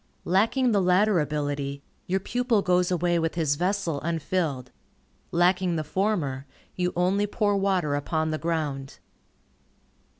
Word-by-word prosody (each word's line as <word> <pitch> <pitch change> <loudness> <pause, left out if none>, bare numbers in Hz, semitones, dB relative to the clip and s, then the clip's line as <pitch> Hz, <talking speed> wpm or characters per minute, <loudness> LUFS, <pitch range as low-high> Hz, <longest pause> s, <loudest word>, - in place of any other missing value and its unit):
Lacking 225 +7 +2
the 205 -2 +3
latter 185 +2 +3
ability, 145 -2 -2 0.2
your 190 +2 +1
pupil 240 0 0
goes 180 -1 +2
away 175 -1 +1
with 165 0 -1
his 160 -4 +1
vessel 175 -3 -1
unfilled. 160 -5 -2 0.6
Lacking 175 0 +2
the 155 - -1
former, 150 -6 -1 0.3
you 180 -1 0
only 190 +4 +1
pour 205 -1 +1
water 190 -6 +1
upon 155 +2 -1
the 155 - -2
ground. 150 -5 -3
175 Hz, 130 wpm, -26 LUFS, 150-195 Hz, 0.6 s, the